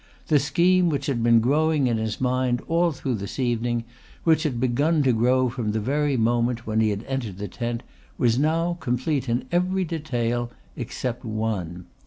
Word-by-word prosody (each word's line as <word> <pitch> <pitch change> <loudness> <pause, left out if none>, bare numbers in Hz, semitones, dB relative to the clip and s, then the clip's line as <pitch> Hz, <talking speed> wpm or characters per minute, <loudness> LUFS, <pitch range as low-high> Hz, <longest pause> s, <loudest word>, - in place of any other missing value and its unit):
The 150 -2 +5
scheme 175 +5 +3
which 140 -3 -1
had 135 -5 -1
been 115 0 +5
growing 150 +3 +2
in 120 -2 +1
his 110 -1 -3
mind 125 -1 +1
all 170 +1 +2
through 135 -3 -3
this 100 -1 -6
evening, 120 -2 0 0.4
which 160 -2 +4
had 140 -7 -1
begun 145 +6 +2
to 130 -2 +3
grow 125 +3 +3
from 120 -4 -2
the 110 - 0
very 140 +4 0
moment 120 +1 +1
when 110 0 0
he 110 - +3
had 100 +1 -3
entered 120 -8 -4
the 105 +1 -4
tent, 120 +4 -4 0.3
was 120 +1 +2
now 165 +3 +1
complete 130 0 -1
in 120 +2 0
every 185 +2 +1
detail 120 -7 -2 0.3
except 120 0 -4
one. 105 -6 -3
125 Hz, 180 wpm, -24 LUFS, 115-150 Hz, 0.4 s, The